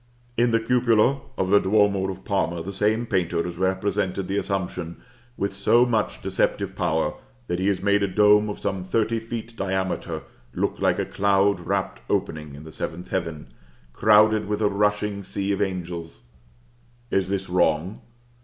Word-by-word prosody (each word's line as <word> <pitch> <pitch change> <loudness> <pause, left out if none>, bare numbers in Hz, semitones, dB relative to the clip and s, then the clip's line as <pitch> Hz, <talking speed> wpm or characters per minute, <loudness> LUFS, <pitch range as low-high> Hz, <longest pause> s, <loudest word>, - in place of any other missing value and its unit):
In 120 +1 +3
the 115 -1 +3
cupola 120 +2 +2 0.2
of 95 0 0
the 100 - +7
duomo 100 -1 +2
of 95 0 -7
Parma 85 -4 -1
the 100 +3 -6
same 105 +4 +1
painter 85 -5 0
has 90 -1 -6
represented 95 0 -1
the 100 - -1
Assumption 90 -4 -3 0.4
with 100 0 -1
so 115 +5 +4
much 115 -4 -1
deceptive - - -1
power, 80 -1 0 0.3
that 90 -5 -2
he 95 - 0
has 100 -2 0
made 100 0 +3
a 100 - +2
dome 105 +2 +4
of 105 - -4
some 95 -2 -3
thirty 115 +4 0
feet 115 0 -7
diameter 95 -2 -2 0.3
look - - -1
like - - +2
a - - -1
cloud 100 -1 +2
wrapt 85 - -2
opening 75 -2 -2
in 70 - -10
the 80 - -10
seventh 90 - -5
heaven, 80 -8 -4 0.4
crowded 105 - +4
with 105 +1 -1
a 105 - +4
rushing 105 0 0
sea 100 +1 -3
of 100 0 -1
angels. 90 -4 -4 0.9
Is 95 -1 +1
this 95 -1 -2
wrong? 90 +1 +1
100 Hz, 165 wpm, -24 LUFS, 90-105 Hz, 0.9 s, the